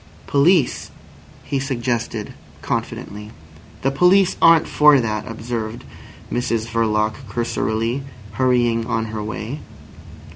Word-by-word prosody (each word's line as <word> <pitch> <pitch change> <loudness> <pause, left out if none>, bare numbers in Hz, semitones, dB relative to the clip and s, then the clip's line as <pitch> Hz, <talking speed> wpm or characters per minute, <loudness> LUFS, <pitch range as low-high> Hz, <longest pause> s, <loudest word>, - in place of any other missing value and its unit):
"Police," 145 0 +2 0.5
he 140 - -2
suggested 120 -5 -3 0.3
confidently. 105 +1 -4 0.5
"The 135 - +2
police 180 +5 +4
aren't 165 -1 +6
for 150 -2 +5
that," 105 -3 -2
observed 115 0 -5 0.5
Mrs 115 -2 -1
Verloc 110 -1 +1 0.2
cursorily, 115 +2 -1 0.3
hurrying 120 -1 +1
on 115 -2 -1
her 110 - -3
way. 110 +6 -5
120 Hz, 100 wpm, -21 LUFS, 110-135 Hz, 0.5 s, aren't